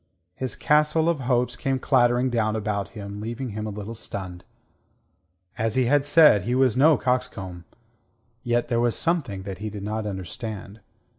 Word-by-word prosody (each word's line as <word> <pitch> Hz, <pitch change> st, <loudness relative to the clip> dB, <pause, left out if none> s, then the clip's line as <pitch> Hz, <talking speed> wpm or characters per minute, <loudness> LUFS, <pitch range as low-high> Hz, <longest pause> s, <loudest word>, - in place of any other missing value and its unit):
His 130 Hz, +5 st, -4 dB
castle 150 Hz, +2 st, +2 dB
of 170 Hz, -3 st, +1 dB
hopes 125 Hz, -1 st, 0 dB
came 135 Hz, +2 st, -1 dB
clattering 125 Hz, -1 st, +2 dB
down 110 Hz, -2 st, 0 dB
about 105 Hz, -2 st, -2 dB
him, 100 Hz, 0 st, -7 dB
leaving 120 Hz, +4 st, -4 dB
him 105 Hz, 0 st, -5 dB
a -, -, -3 dB
little 105 Hz, +2 st, -6 dB
stunned. 95 Hz, -5 st, -7 dB, 1.2 s
As 110 Hz, -1 st, 0 dB
he 130 Hz, -1 st, +3 dB
had 145 Hz, +3 st, +3 dB
said, 145 Hz, -7 st, +6 dB
he 120 Hz, +7 st, -1 dB
was 130 Hz, -3 st, +3 dB
no 150 Hz, +4 st, +5 dB
coxcomb. 95 Hz, -9 st, -2 dB, 0.8 s
Yet 120 Hz, -1 st, 0 dB
there 120 Hz, -1 st, +1 dB
was 120 Hz, -1 st, +1 dB
something 150 Hz, -, -1 dB
that 95 Hz, -1 st, -7 dB
he 110 Hz, 0 st, -4 dB
did 105 Hz, -1 st, -7 dB
not 110 Hz, +1 st, -3 dB
understand. 100 Hz, +2 st, -6 dB
115 Hz, 165 wpm, -24 LUFS, 105-130 Hz, 1.2 s, said